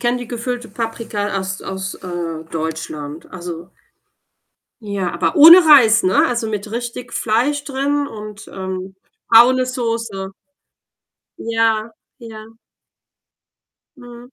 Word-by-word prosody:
kenne 245 0 0
die 245 - -8
gefüllte 240 0 -4
Paprika 220 -2 -4
aus 190 0 -5
aus, 190 0 -5
äh, 170 -3 -6
Deutschland. 155 -2 -6
Also 175 -1 -7 1.1
Ja, 200 -4 -3
aber - - -1
ohne 325 +4 +10
Reis, 235 -7 +6
ne? 185 +1 +3
Also, 235 -2 -2
mit 210 0 -5
richtig 240 +1 -6
Fleisch 255 +6 0
drin 285 +1 -1
und 210 -4 -10
ähm, 190 0 -6 0.3
braune 250 +3 +6
Soße. 230 -6 -4 1.1
Ja, 225 -1 0 0.3
ja. 225 -2 -11 1.4
Mhm. 245 0 -13
225 Hz, 110 wpm, -18 LUFS, 190-245 Hz, 1.4 s, ohne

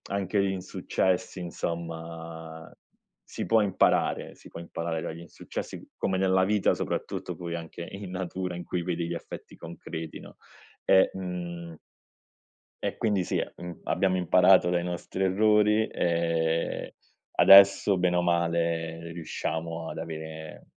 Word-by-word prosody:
anche 100 0 0
gli 100 0 +2
insuccessi, 95 0 -1
insomma 80 -1 -6 0.6
si - - -4
può 115 -1 +4
imparare, 100 -3 +1
si - - -15
può 85 - -9
imparare 85 -1 -3
dagli 80 +1 -5
insuccessi, 85 -1 -7
come 95 - 0
nella 95 0 +3
vita, 105 0 +2
soprattutto - - -3
poi 85 -1 -5
anche 85 +1 -7
in 95 -1 -7
natura 90 0 -3
in 90 - -5
cui 85 0 -2
vedi 85 -2 -2
gli 85 - -2
effetti - - -9
concreti, 80 -1 -7
no, - - -13 0.5
ehm, 95 0 +5
uhm 85 -2 -5 1.1
e, - - -2
quindi, 100 -5 +1
sì, - - 0
mhmm, 85 0 -8
abbiamo 95 -1 +1
imparato 90 +1 +5
dai 90 -1 +1
nostri 90 +2 -3
errori, 105 +2 +3
ehm, 85 -1 0 0.5
adesso, 100 0 +8
bene 90 0 +2
o 90 - +3
male, 85 -1 0
riusciamo 80 0 -4
ad - - -6
avere 80 -1 -7
85 Hz, 135 wpm, -28 LUFS, 85-95 Hz, 1.1 s, adesso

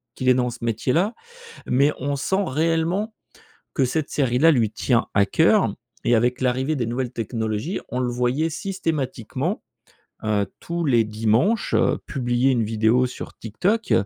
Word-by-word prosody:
qu'il 130 - -3
est - - +7
dans 125 -1 +1
ce 120 - -7
métier 115 +2 0
là. 195 +8 +2 0.5
Mais, 140 +4 +3
on 140 +2 -2
sent 190 +9 0
réellement, 165 - 0 0.6
que 135 - +2
cette 155 +4 -2
série 125 -4 +1
là 165 +4 +6
lui 115 -8 +2
tient 115 +1 +1
à 100 - +5
cœur 160 - +3 0.3
et 120 - +3
avec 125 +3 +1
l'arrivée 130 +4 +1
des 120 - -1
nouvelles 120 +1 -2
technologies, 110 - -3
on 125 - -2
le 125 -1 0
voyait 125 +6 0
systématiquement, 160 - -3 0.6
heu, 105 -2 +1
tous 170 0 -3
les 120 -5 +3
dimanches, 115 - +1
heu, - - +3
publier 125 -1 +1
une 120 -4 +2
vidéo 110 +3 +2
sur 125 - -8
TikTok, 195 - -1
130 Hz, 160 wpm, -23 LUFS, 115-160 Hz, 0.6 s, est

